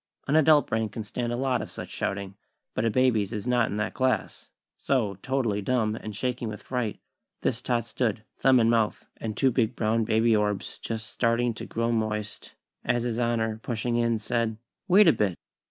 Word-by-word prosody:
_" - - -30
An 140 - +2
adult 155 -1 +6
brain 110 -1 -1
can 110 +1 -6
stand 120 +3 -3
a - - 0
lot 130 -1 0
of - - -6
such - - -7
shouting, 100 0 -3 0.4
but 110 - -1
a - - +3
baby's 115 -4 +2
is 105 -3 -4
not 125 -2 +2
in 105 - -3
that 105 - -1
class; 130 -5 -1 0.3
so, 105 -8 0
totally 125 -6 0
dumb, 110 -1 +1
and 110 -2 -7
shaking 125 +1 -2
with 105 -1 -7
fright, 125 -5 -2 0.4
this - - 0
tot 120 -2 0
stood, 110 -3 -1
thumb 130 -2 +4
in 115 - +4
mouth, 115 -2 +1
and 110 -2 -5
two 135 -2 +3
big 120 -1 +1
brown 115 +1 +1
baby 110 +1 +3
orbs 105 -2 -1
just 110 -1 -4
starting 120 +1 +1
to - - -8
grow 115 +1 -1
moist, 105 -2 -3 0.3
as 120 - +1
His 120 -1 -2
Honor, 115 -2 0
pushing 120 0 -2
in, 115 -1 +2
said: 115 0 -1 0.3
"Wait 195 +1 +7
a 160 - +7
bit!!" 100 -4 0
115 Hz, 200 wpm, -27 LUFS, 110-125 Hz, 0.4 s, Wait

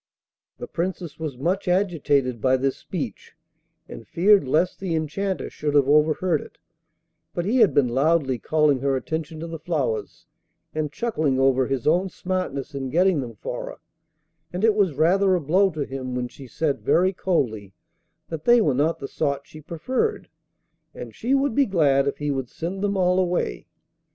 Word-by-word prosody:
The - - -6
Princess 170 0 -4
was 155 -5 -4
much 180 +8 -1
agitated 145 - +1
by 130 +2 +3
this 135 +1 0
speech, - - -6 0.5
and - - -10
feared 195 -3 +4
lest 165 +7 +1
the 185 -4 -2
Enchanter 185 +5 -2
should 150 -1 -3
have 140 -2 +4
overheard 155 +3 +3
it; - - -14 0.8
but 175 - -1
he 225 +6 +1
had 220 -5 +5
been 140 -3 +4
loudly 135 0 +1
calling 150 +1 +2
her 135 +1 0
attention 160 +4 -4
to - - -4
the 165 -1 -6
flowers, 145 -9 -3 0.5
and 155 -2 -2
chuckling 155 - 0
over 135 -1 +3
his 135 -3 -2
own 180 +5 +2
smartness 180 -8 -3
in 135 -1 -4
getting 175 +1 +3
them 120 -3 -7
for - - -5
her; - - -8 0.7
and 180 +3 -4
it 225 -1 +5
was 195 -8 +1
rather 185 +5 +3
a - - +1
blow 180 +6 +3
to 155 -5 -4
him 130 -1 -5
when 125 0 -2
she 135 +2 -12
said 145 +4 -1
very 185 +2 +3
coldly 110 - -1 0.5
that 160 -2 -6
they 240 0 +6
were 175 -11 +2
not 150 +6 +1
the 135 - -6
sort 140 -2 -2
she 155 - -13
preferred, 255 - -2 0.7
and - - -8
she 260 +4 0
would 275 -2 +1
be 275 +3 +3
glad 140 -8 +3
if 140 - -1
he 145 0 -2
would 135 -3 -3
send 180 +4 -5
them 200 -1 0
all 180 0 +3
away. 175 - -1
155 Hz, 180 wpm, -24 LUFS, 135-185 Hz, 0.8 s, they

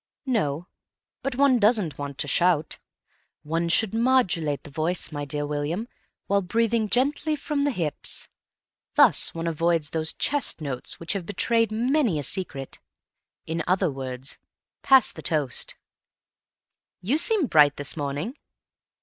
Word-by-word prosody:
"No. 175 - -1 0.6
But 275 -1 -3
one 270 -2 +4
doesn't 210 -8 +2
want 140 -1 -5
to 150 - -1
shout. 165 +1 +1 0.6
One 165 +2 -1
should 215 +4 +3
modulate 225 - +1
the 145 - -11
voice, 160 +4 -1
my 145 -1 -4
dear 145 +1 -3
William, 150 +9 -3 0.4
while 200 0 +1
breathing 225 +3 0
gently 290 +6 +1
from 295 0 -3
the 285 - +2
hips. 165 - -3 0.7
Thus - - +4
one 165 0 -4
avoids 165 -1 0
those 160 0 -1
chest 290 - 0
notes 140 -5 -4
which 165 - -2
have 190 -4 -5
betrayed 230 +1 +1
many 240 - +1
a 145 - -3
secret. 140 -6 -3 0.7
In 165 0 -3
other 185 -2 +2
words, 130 0 -6 0.4
pass 265 -1 +5
the - - -10
toast." 145 -6 0 1.3
"You 245 - +2
seem 430 -3 +4
bright 150 - +4
this 145 - -2
morning." 145 - -4
170 Hz, 140 wpm, -25 LUFS, 150-235 Hz, 1.3 s, pass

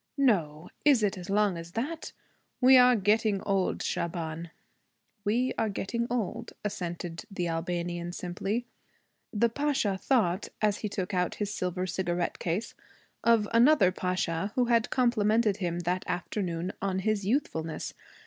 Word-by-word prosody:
'No! 175 - +1
Is 275 -7 +5
it 205 0 +1
as 185 0 -8
long 200 -2 +2
as 165 +1 -10
that? 300 +8 -3 0.5
We 260 +1 +7
are 250 -1 +7
getting 210 0 +2
old, 195 -2 0
Shaban.' 165 -1 -3 0.7
'We 240 +5 +1
are 220 - +1
getting 235 +4 -2
old,' 235 -1 -3
assented 175 -3 -4
the 180 -4 -2
Albanian 175 +1 -2
simply. 195 +7 -3 0.7
The 230 +2 +3
Pasha 235 -6 0
thought, 205 -8 +1
as 210 -1 +1
he 210 - -3
took 190 -1 -3
out 180 -1 0
his 205 -1 -3
silver 180 -1 -2
cigarette 175 -1 -2
case, 180 +6 -2 0.5
of 230 -3 +4
another 235 -5 +6
pasha 185 0 -1
who 250 - +3
had 235 -2 +2
complimented 220 -4 +2
him 175 -3 -2
that 180 +2 -1
afternoon 175 -1 -2
on 195 -1 0
his 215 -2 +1
youthfulness. 165 - -1
195 Hz, 140 wpm, -29 LUFS, 175-230 Hz, 0.7 s, We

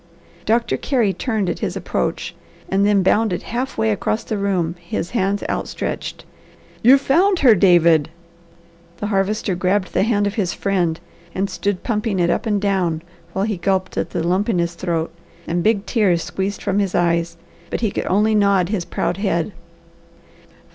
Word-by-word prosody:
Doctor 230 +2 +2
Carey 235 -8 +1
turned 220 -5 -1
at - - -2
his - - -3
approach - - -2 0.4
and 195 +1 +2
then 200 -2 +3
bounded 210 -1 +2
half 250 +4 -4
way 110 0 +2
across 215 - -1
the 220 - -3
room, 190 -5 0
his 170 0 -4
hands 200 -3 0
outstretched. - - -4 0.6
"You've 260 +4 +7
found 360 +8 +3
her, 250 -5 +7
David!" 170 -5 +4 0.9
The - - -4
Harvester 195 +1 0
grabbed 185 +2 0
the - - +2
hand 205 -1 +2
of 200 - -1
his 200 -6 -1
friend 180 -5 0 0.4
and 195 +1 -1
stood 200 -3 -2
pumping 215 -3 -1
it 170 -1 +3
up - - -1
and 210 -2 +1
down 185 -5 0 0.3
while 195 +1 0
he 210 -3 -2
gulped 190 +1 -1
at - - -1
the 165 - -2
lump 190 +5 +1
in 205 - +1
his 170 0 0
throat, 170 -2 -2 0.3
and 175 +1 0
big 210 +1 +1
tears 190 -8 +2
squeezed 195 +1 -3
from 200 +1 +1
his 195 -3 0
eyes, 170 -1 +1 0.3
but - - -3
he 220 -4 +1
could - - -3
only 210 +3 +3
nod 200 -4 +3
his 195 -5 -2
proud - - -2
head. 195 -3 0
195 Hz, 175 wpm, -20 LUFS, 175-215 Hz, 0.9 s, You've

